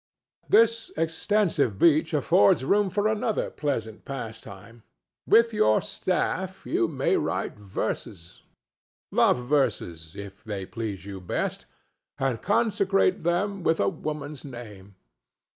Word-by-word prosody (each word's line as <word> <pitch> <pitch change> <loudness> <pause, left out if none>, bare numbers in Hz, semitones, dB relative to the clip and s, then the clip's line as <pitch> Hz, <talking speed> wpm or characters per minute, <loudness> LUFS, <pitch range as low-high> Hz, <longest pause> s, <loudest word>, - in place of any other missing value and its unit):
This 230 0 +4
extensive 165 - +1
beach 160 +2 +4
affords 130 -5 +4
room 200 +4 +3
for 205 +3 +1
another 215 0 -1
pleasant 115 -7 -3
pastime. 115 -3 -8 0.5
With 230 0 +5
your 110 - +4
staff - - -2
you - - +1
may - - +1
write - - -2
verses—love 95 +1 -3
verses 105 - -1
if 100 -1 -9
they 100 -4 -5
please 100 -5 -5
you 100 -2 -7
best—and 125 +6 -5
consecrate 200 -2 +2
them 190 +4 0
with 165 -1 +1
a 100 - +3
woman's 150 -1 -6
name. 105 -7 -10
135 Hz, 110 wpm, -26 LUFS, -, 0.5 s, With